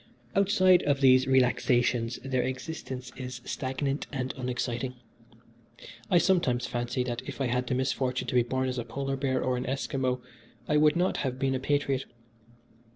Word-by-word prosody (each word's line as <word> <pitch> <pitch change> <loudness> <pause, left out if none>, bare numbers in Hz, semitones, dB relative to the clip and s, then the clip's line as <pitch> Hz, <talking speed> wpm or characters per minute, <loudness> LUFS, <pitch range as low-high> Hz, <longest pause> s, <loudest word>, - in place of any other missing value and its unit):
Outside 190 -2 +5
of 140 -1 +1
these 130 -1 +5
relaxations 125 -2 +2
their 130 -2 +1
existence 130 0 -5
is 125 -2 -6
stagnant 135 +2 -2
and 130 -2 -3
unexciting. 125 0 -3 1.1
I - - +5
sometimes 170 -10 +2
fancy 120 +1 -2
that 120 -1 -3
if - - -7
I 135 - +1
had 125 0 0
the 125 - 0
misfortune 130 -1 -1
to - - -3
be 125 - +5
born 130 +2 -1
a 125 -2 -2
polar 135 +2 -3
bear 135 -1 0
or 130 -1 0
an 125 - -4
Esquimo 130 -1 -1 0.5
I 150 - +3
would 150 +1 +5
not 180 +2 +1
have 130 -2 -2
been 135 0 0
a 130 - -1
patriot. 140 -1 0
130 Hz, 160 wpm, -28 LUFS, 125-135 Hz, 1.1 s, Outside